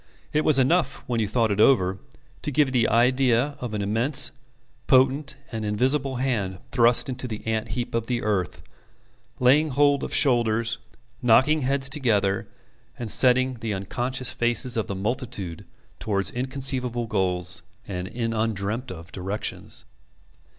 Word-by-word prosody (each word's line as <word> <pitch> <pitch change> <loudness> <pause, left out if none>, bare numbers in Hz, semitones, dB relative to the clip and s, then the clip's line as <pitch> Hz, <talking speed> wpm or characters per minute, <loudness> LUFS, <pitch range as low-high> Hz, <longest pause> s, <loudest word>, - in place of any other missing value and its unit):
It 150 - +3
was 150 -3 +4
enough, 160 +7 +1
when 120 -2 -1
you 110 - 0
thought 115 +1 +1
it 100 - -1
over, 95 -6 +4 0.4
to 150 - -3
give 145 0 +2
you - - -6
the 120 -3 +2
idea 125 +3 +2
of 120 -4 -4
an 105 - -2
immense, 120 +8 +1 0.6
potent, 135 +2 +3 0.2
and 110 -2 -4
invisible 130 +6 0
hand 115 -8 -1
thrust 120 -1 +4
into 130 -1 -4
the 110 -3 -7
ant 110 0 -1
heap 120 - -3
of 115 -1 -1
the 120 -1 -2
earth, 100 -5 -2 0.8
laying 145 +5 +4
hold 145 0 +2
of - - -4
shoulders, 115 -4 +2 0.4
knocking 130 +6 +4
heads 135 +1 +1
together, 110 -9 0 0.5
and 115 -4 -3
setting 130 0 +3
the 110 -3 -2
unconscious 125 +6 -2
faces 120 +1 +2
of 110 - -1
the 100 - -4
multitude 105 - -4 0.3
towards 100 -3 -1
inconceivable 130 -2 -1
goals 90 -5 0 0.3
and 90 -2 -4
in 115 +2 -3
undreamt 110 +2 -2
of 85 -1 -10
directions. 95 +3 -3
120 Hz, 150 wpm, -24 LUFS, 105-130 Hz, 0.8 s, was